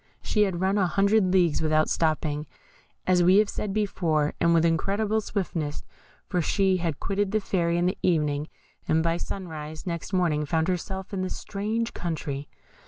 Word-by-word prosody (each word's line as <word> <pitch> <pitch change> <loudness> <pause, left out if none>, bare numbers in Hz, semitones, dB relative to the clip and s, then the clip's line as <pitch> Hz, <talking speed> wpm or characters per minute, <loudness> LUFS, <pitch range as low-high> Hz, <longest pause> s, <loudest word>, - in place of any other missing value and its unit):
She 210 -1 +2
had 185 -3 -3
run 195 +2 +2
an 190 - +3
hundred 195 +2 +3
leagues 175 -5 +3
without 155 0 +2
stopping, 155 -2 0 0.6
as 180 -1 +4
we 180 +3 +6
have 210 -1 +4
said 210 - -3
before, 170 -8 0
and 170 - +3
with 165 0 +4
incredible 200 +6 +1
swiftness, 170 -8 -3 0.4
for 180 -2 0
she 190 +3 +2
had 165 -5 -2
quitted 200 0 -1
the 215 - +2
Fairy 170 -4 0
in 175 - +1
the 185 - 0
evening, 150 -4 +1 0.4
and 160 +1 +2
by 165 0 +1
sunrise 160 -4 -6
next 170 0 -4
morning 170 -5 +1
found 160 +3 0
herself 190 +2 -3
in 190 - -1
this 185 - -3
strange 220 +3 -3
country. 150 -4 -4
175 Hz, 170 wpm, -26 LUFS, 160-195 Hz, 0.6 s, we